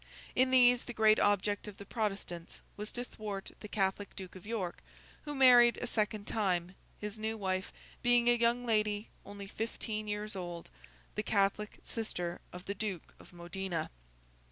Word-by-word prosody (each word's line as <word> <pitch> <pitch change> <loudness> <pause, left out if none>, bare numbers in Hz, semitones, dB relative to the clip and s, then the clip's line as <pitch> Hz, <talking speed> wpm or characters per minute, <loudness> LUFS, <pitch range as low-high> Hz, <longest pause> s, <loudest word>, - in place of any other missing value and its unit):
In 255 +1 +4
these, 250 -1 +6
the 240 - -6
great 215 -1 +6
object 205 +1 +2
of 205 - -8
the 200 - -9
Protestants 195 -6 -3 0.2
was 210 +1 -6
to 245 - -3
thwart 210 -5 -6
the 210 - -8
Catholic 200 -1 -1
Duke 190 -1 -8
of 185 +2 -11
York, 200 -6 -3 0.4
who 295 -1 -4
married 245 -3 +8
a - - -3
second 215 -3 -1
time; 185 -5 0 0.3
his 210 +1 -5
new 220 +1 -2
wife 190 -2 -1 0.3
being 240 -1 +4
a 240 - +7
young 240 +1 +2
lady 210 -2 +1 0.2
only 200 0 -7
fifteen 215 +1 -4
years 210 0 -3
old, 175 -2 -6 0.4
the 210 - -1
Catholic 205 0 +1
sister 180 -6 -3
of 180 0 -9
the 200 - -2
Duke 195 -4 -4
of - - -15
Modena. 175 -1 -4
210 Hz, 165 wpm, -33 LUFS, 195-225 Hz, 0.4 s, married